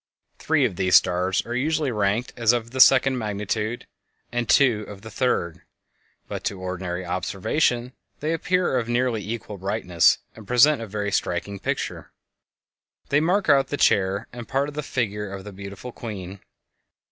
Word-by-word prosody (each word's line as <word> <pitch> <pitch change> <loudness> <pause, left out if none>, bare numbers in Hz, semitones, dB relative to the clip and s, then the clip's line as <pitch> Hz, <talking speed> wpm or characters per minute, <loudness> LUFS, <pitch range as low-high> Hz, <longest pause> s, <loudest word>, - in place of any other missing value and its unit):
Three - - +2
of 90 - -2
these 95 -1 +3
stars 90 +2 +3
are 120 - -5
usually 150 +1 0
ranked 105 +2 0
as 115 -1 +3
of 115 -1 -2
the 130 - -5
second 130 -1 +6
magnitude, 105 +2 -3 0.5
and 120 -1 -2
two 120 -7 +4
of 100 -1 -10
the 110 - -9
third; 95 -11 -1 0.7
but - - -5
to 100 - -2
ordinary 90 -1 -4
observation 120 - -1 0.3
they 155 +2 -1
appear 180 -4 +1
of 115 -1 -4
nearly 120 -2 +1
equal 105 -1 -6
brightness, 95 -3 +2 0.2
and 110 -3 -13
present 125 +4 +5
a 115 - -5
very 100 0 -3
striking 100 +2 -2
picture. - - -4 1.0
They 140 - +4
mark 180 +6 +1
out 135 -3 +4
the 145 - -3
chair 100 0 +2
and 120 - -7
a - - -8
part 135 +4 -1
of - - -10
the 150 - -3
figure 105 -7 -3
of 100 -1 -7
the 105 0 -9
beautiful 100 +5 -8
queen. 100 -5 -7
110 Hz, 170 wpm, -24 LUFS, 100-130 Hz, 1.0 s, second